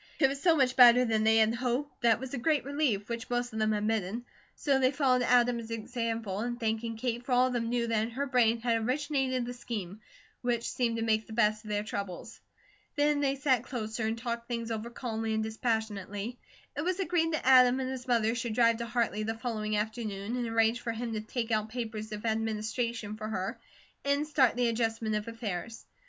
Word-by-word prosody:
It 270 - +5
was 275 0 -5
so 335 -1 +4
much 255 -2 +2
better 250 0 +8
than 220 -2 +1
they 220 0 +5
had 220 0 +4
hoped, 250 +4 -2
that 230 -1 +5
it - - -12
was 265 +1 -7
a 265 - -2
great 300 +2 +1
relief, 275 -8 0
which 235 0 -5
most 245 -1 -1
of 220 - -3
them 215 0 +2
admitted; 215 +1 -1 0.3
so 275 -2 +1
they 255 -1 +4
followed 260 -3 +2
Adam's 240 -2 +2
example 225 -2 -3
in 240 +1 -3
thanking 225 0 -2
Kate, 240 0 -2
for 250 - -2
all 250 +1 +5
of 255 - -1
them 230 -1 -1
knew 240 -1 0
that 225 -2 +1
in 225 - -2
her 265 +4 -2
brain 240 -4 +3
had 230 -1 +1
originated 260 0 0
the 245 - -5
scheme, 215 -5 -6 0.4
which 240 -1 -1
seemed 235 -2 0
to 225 - -2
make 220 -1 +1
the 220 - -9
best 215 -1 +2
of 215 - -10
their 205 0 0
troubles. 200 0 -6 0.5
Then 295 0 +2
they 275 -1 +1
sat 265 -4 +2
closer 220 -3 -3
and 225 +1 -1
talked 235 0 -4
things 230 -1 -3
over 225 +1 -3
calmly 225 -2 -3
and 220 - 0
dispassionately. 220 -1 -3 0.4
It 285 - -2
was 365 +3 -1
agreed 345 -3 +1
that 310 - -2
Adam 255 -1 +6
and 260 0 -2
his 260 -1 -6
mother 230 -2 +2
should 240 -2 -3
drive 230 -1 +4
to 235 0 -4
Hartley 230 -3 0
the 225 +1 -2
following 215 -3 -2
afternoon 215 0 -3
and 245 -2 -2
arrange 225 +1 +2
for 230 -1 -2
him 230 0 -4
to 215 - -2
take 230 +1 -4
out 215 0 0
papers 220 -2 -5
of 210 +1 -6
administration 220 0 -2
for 215 0 -5
her, 195 -3 -3 0.4
and 280 +1 +1
start 275 -6 +3
the 245 0 +2
adjustment 225 -1 -1
of 210 0 -2
affairs. 225 -1 -5
230 Hz, 215 wpm, -30 LUFS, 220-250 Hz, 0.5 s, better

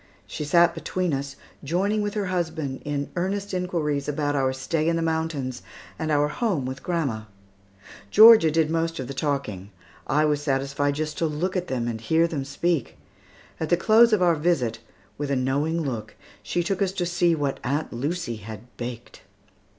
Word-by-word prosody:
She - - -5
sat 170 +3 +4
between 180 -4 -2
us, 135 0 -3 0.3
joining 195 +8 0
with 205 0 -3
her 205 -2 -1
husband 160 -7 -2
in 145 -1 -3
earnest 195 +3 -2
inquiries 165 -6 -1
about 145 0 -1
our 135 -2 +2
stay 155 +5 -1
in 170 - +1
the 165 - 0
mountains 160 -6 -2 0.4
and 160 - -2
our 145 -1 +3
home 180 - -1
with 130 +1 -5
grandma. 140 -11 -2 0.8
Georgia 220 - +8
did 160 0 +1
most 165 0 -1
of 130 - -4
the 140 - -5
talking. 135 -9 -3 0.4
I 150 +1 +3
was 150 -1 +1
satisfied 140 0 0
just 155 0 -3
to 165 - +2
look 165 +5 -2
at 180 -1 -1
them 120 -3 -2
and 115 -2 -4
hear 160 +8 +3
them 150 -5 -3
speak. 145 0 -1 0.6
At 160 - -2
the 175 - +4
close 225 +5 +5
of 210 -4 +3
our 175 -1 +5
visit, 150 -8 0 0.4
with 145 -1 -2
a 140 - +1
knowing 140 +6 0
look, 120 -7 -5 0.3
she 175 - -1
took 195 +3 -2
us 190 -1 +1
to 180 -2 -1
see 175 -1 +2
what 145 -3 -2
Aunt 145 +5 -2
Lucy 140 -1 -3
had 110 +1 -8 0.2
baked. 120 -1 -7
155 Hz, 180 wpm, -25 LUFS, 135-175 Hz, 0.8 s, Georgia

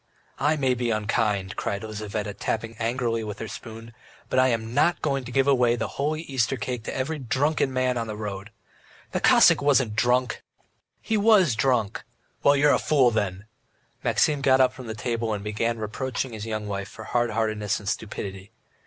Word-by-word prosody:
"I 150 +3 +2
may 135 -4 +1
be 120 -1 -1
unkind," 105 -2 0
cried 100 +2 -3
Lizaveta, 105 -1 -4
tapping 115 +3 -3
angrily 115 -1 -1
with 105 -2 -6
her 110 - -5
spoon, 115 +2 -9 0.4
"but 130 - +3
I 130 - +5
am 115 -2 -1
not 155 +6 +3
going 135 -3 0
to 125 - -7
give 135 +1 +2
away 125 -4 +4
the 115 - -3
holy 155 +3 -2
Easter 135 -3 0
cake 120 +2 -4
to - - -4
every 140 +4 -2
drunken 135 +3 0
man 130 -1 0
in 115 -1 -2
the 110 - -5
road." 105 -1 -6 0.6
"The - - -1
Cossack - - +6
wasn't 135 -6 +2
drunk!" 125 +2 +1 0.6
"He 220 - 0
was 205 - +5
drunk!" 120 -1 0 0.4
"Well, 140 - +5
you 145 +1 +4
are - - +5
a - - +2
fool 135 -5 +3
then!" 100 -3 -2 0.6
Maxim 145 -2 +2
got 135 -1 +4
up 130 -1 +4
from 130 -2 -10
the 110 - -5
table 115 0 -2
and 100 - -6
began 115 +2 -1
reproaching 125 +3 -3
his 110 0 -6
young 110 -1 -3
wife 100 -1 -4
for 110 - -10
hard 120 +1 0
heartedness 110 -3 -1
and 100 - -11
stupidity. 100 -2 -4
115 Hz, 190 wpm, -25 LUFS, 110-130 Hz, 0.6 s, Cossack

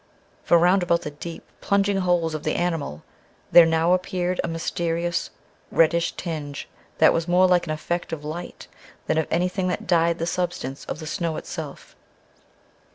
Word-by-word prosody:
For 170 - +5
round 180 +3 +4
about 170 -1 +1
the 150 - -5
deep, 165 +3 -8 0.2
plunging 200 0 +2
holes 175 -3 +1
of 155 - -3
the - - -1
animal 165 - -2 0.5
there 170 -1 +9
now 165 +2 +3
appeared 180 0 -1
a - - -2
mysterious, 170 +1 -2 0.4
reddish 165 +1 +2
tinge 150 -5 -5 0.3
that - - +6
was 165 +1 -1
more 180 +1 +5
like 180 -1 +2
an - - -2
effect 170 +3 -3
of 150 -2 -5
light 170 +4 -7 0.4
than 160 - +1
of 160 - -1
anything 180 +2 0
that 180 - -2
dyed 170 -1 +2
the 165 - -2
substance 175 -6 -3
of - - -5
the 160 - -8
snow 165 0 -2
itself. - - -8
170 Hz, 165 wpm, -24 LUFS, 160-180 Hz, 0.5 s, there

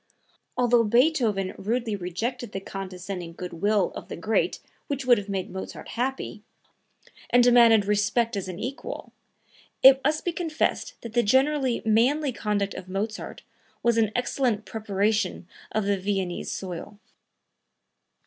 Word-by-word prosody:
Although 240 -2 +4
Beethoven 230 -5 +2
rudely 230 +1 -1
rejected 220 +6 -4
the 195 - -2
condescending 185 -2 -6
good 180 +1 -7
will 200 +2 +1
of - - -8
the - - -6
great 215 +6 0 0.3
which 280 -3 -3
would 245 -3 +5
have 205 0 -8
made 190 -2 -3
Mozart 190 - -7
happy, 250 -2 -3 0.9
and 245 0 +5
demanded 235 -4 +6
respect 210 +3 +1
as 195 -2 -3
an 180 -2 -6
equal, 260 +7 -6 0.7
it 265 0 +9
must 305 +2 0
be 350 - +1
confessed 325 -2 -2
that 230 -2 -8
the 240 - +4
generally 265 +2 +2
manly 260 +7 +3
conduct 205 -3 -1
of 185 0 -8
Mozart 210 +3 -4 0.4
was 235 -1 +3
an 220 -2 +2
excellent 245 -3 0
preparation 210 -3 -1 0.2
of 215 - 0
the 200 -1 +1
Viennese 190 -2 -2
soil. 185 +2 -6
220 Hz, 140 wpm, -26 LUFS, 195-245 Hz, 0.9 s, it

